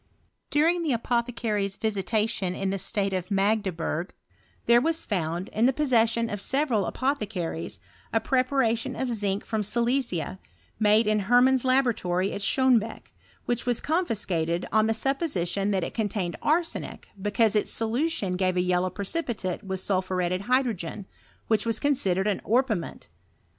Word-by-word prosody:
During; 330 Hz, +4 st, +3 dB
the 310 Hz, -5 st, 0 dB
apothecaries' 230 Hz, -4 st, -1 dB
visi 215 Hz, -3 st, -1 dB
tation 205 Hz, -3 st, 0 dB
in 195 Hz, -1 st, 0 dB
the 195 Hz, -, -2 dB
state 195 Hz, +1 st, -1 dB
of 185 Hz, 0 st, -3 dB
Magdeburg, 195 Hz, -4 st, 0 dB, 0.5 s
there 235 Hz, 0 st, +5 dB
was 325 Hz, +3 st, -1 dB
found, 175 Hz, -2 st, -2 dB
in 225 Hz, +3 st, +2 dB
the -, -, +4 dB
possession 230 Hz, -5 st, +2 dB
of 205 Hz, -3 st, -4 dB
several 260 Hz, -, +1 dB
apothecaries, 205 Hz, -, -2 dB, 0.3 s
a 225 Hz, -, +2 dB
prepct 255 Hz, +2 st, +1 dB
ration 255 Hz, -1 st, +1 dB
of 260 Hz, -2 st, -2 dB
zinc 205 Hz, -3 st, -2 dB
from 220 Hz, -2 st, -1 dB
Silesia, 235 Hz, -, -1 dB, 0.4 s
made 215 Hz, +1 st, +4 dB
in 215 Hz, 0 st, +2 dB
Hermann's 250 Hz, +1 st, +5 dB
la 260 Hz, +1 st, +4 dB
boratory 190 Hz, -6 st, -1 dB
at -, -, -4 dB
Schonebeck, 235 Hz, 0 st, +1 dB, 0.3 s
which 240 Hz, +1 st, -2 dB
was 245 Hz, -2 st, +1 dB
confiscated 190 Hz, -, -1 dB
ob 215 Hz, 0 st, +4 dB
the 225 Hz, -, +1 dB
supposition 205 Hz, -, -1 dB
that 190 Hz, -3 st, +1 dB
it -, -, -4 dB
contained 200 Hz, -6 st, -2 dB
arsenic, 330 Hz, +3 st, -1 dB
because 210 Hz, +2 st, +2 dB
iti 210 Hz, -, +2 dB
solution 225 Hz, -, -1 dB
gave 185 Hz, -1 st, +1 dB
a -, -, +4 dB
yellow 180 Hz, 0 st, +1 dB
precipitate 200 Hz, -, -3 dB
with 190 Hz, -1 st, -4 dB
sulphuretted 185 Hz, -1 st, 0 dB
hydrogen, 225 Hz, -8 st, 0 dB, 0.4 s
which 220 Hz, -2 st, +2 dB
was 225 Hz, -1 st, 0 dB
considered 200 Hz, -10 st, +1 dB
as 205 Hz, -, 0 dB
orpiment. 225 Hz, -, -1 dB
215 Hz, 150 wpm, -26 LUFS, 190-250 Hz, 0.5 s, there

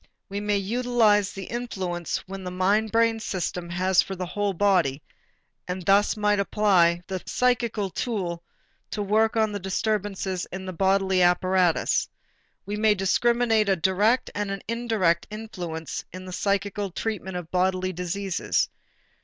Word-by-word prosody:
We 200 Hz, +1 st, -3 dB
may 205 Hz, 0 st, 0 dB
utilize 215 Hz, -1 st, +2 dB
the 195 Hz, -, -6 dB
influence 190 Hz, -8 st, -4 dB
which 195 Hz, 0 st, -7 dB
the 180 Hz, -, -4 dB
mind 200 Hz, +4 st, +1 dB
brain 230 Hz, 0 st, +3 dB
system 180 Hz, -4 st, -3 dB
has 185 Hz, +2 st, +3 dB
for 195 Hz, -, -5 dB
the 185 Hz, 0 st, -4 dB
whole 205 Hz, +2 st, -1 dB
body 180 Hz, -8 st, +2 dB, 0.7 s
and 180 Hz, -1 st, -4 dB
thus 200 Hz, +3 st, +4 dB
may 210 Hz, -1 st, +2 dB
apply 185 Hz, -4 st, +3 dB
the 190 Hz, -2 st, -4 dB
psychical 235 Hz, -5 st, 0 dB
tool 180 Hz, -6 st, -3 dB, 0.5 s
to 210 Hz, -, -3 dB
work 220 Hz, +3 st, +2 dB
on 220 Hz, -1 st, +2 dB
the 205 Hz, -, -3 dB
disturbances 195 Hz, -1 st, -2 dB
in 190 Hz, +1 st, -6 dB
the 185 Hz, -, -5 dB
bodily 190 Hz, 0 st, +2 dB
apparatus. 180 Hz, 0 st, +2 dB, 0.6 s
We 205 Hz, +2 st, -3 dB
may 215 Hz, 0 st, +4 dB
discriminate 225 Hz, +2 st, +2 dB
a 195 Hz, -, +4 dB
direct 200 Hz, +8 st, +2 dB
and 205 Hz, -1 st, -2 dB
an 195 Hz, -1 st, -4 dB
indirect 220 Hz, -8 st, +1 dB
influence 180 Hz, -8 st, -6 dB
in 185 Hz, 0 st, -8 dB
the 185 Hz, -, -7 dB
psychical 200 Hz, +1 st, -1 dB
treatment 190 Hz, -1 st, -4 dB
of 175 Hz, -2 st, -7 dB
bodily 185 Hz, 0 st, +1 dB
diseases. 180 Hz, +2 st, -1 dB
195 Hz, 145 wpm, -25 LUFS, 185-210 Hz, 0.7 s, thus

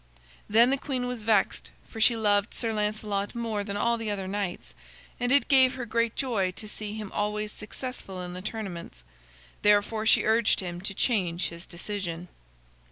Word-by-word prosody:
Then 230 Hz, +4 st, +6 dB
the 275 Hz, -, +1 dB
queen 260 Hz, -3 st, -2 dB
was 245 Hz, -2 st, -4 dB
vexed, 210 Hz, -2 st, +1 dB, 0.2 s
for 225 Hz, -, -7 dB
she 230 Hz, +1 st, +6 dB
loved 205 Hz, -1 st, +2 dB
Sir 225 Hz, -2 st, 0 dB
Lancelot 210 Hz, 0 st, -1 dB
more 225 Hz, -3 st, -2 dB
than 200 Hz, 0 st, -4 dB
all 235 Hz, +2 st, +2 dB
the 225 Hz, -2 st, -3 dB
other 195 Hz, -2 st, -2 dB
knights, 195 Hz, -2 st, -4 dB, 0.5 s
and 245 Hz, 0 st, 0 dB
it 280 Hz, -3 st, +4 dB
gave 260 Hz, -1 st, +5 dB
her 255 Hz, -2 st, -4 dB
great 230 Hz, 0 st, 0 dB
joy 220 Hz, -8 st, 0 dB
to 215 Hz, -, -7 dB
see 210 Hz, 0 st, -6 dB
him 215 Hz, -3 st, -6 dB
always 210 Hz, 0 st, -1 dB
successful 210 Hz, -3 st, -6 dB
in 180 Hz, 0 st, -6 dB
the 180 Hz, -, -6 dB
tournaments. 185 Hz, -, -6 dB, 0.6 s
Therefore 210 Hz, +1 st, +3 dB
she -, -, +6 dB
urged 225 Hz, 0 st, +3 dB
him 175 Hz, -2 st, -5 dB
to 195 Hz, +1 st, -4 dB
change 185 Hz, -8 st, +1 dB
his 170 Hz, +1 st, -9 dB
decision. 175 Hz, -2 st, -4 dB
210 Hz, 175 wpm, -28 LUFS, 195-230 Hz, 0.6 s, Then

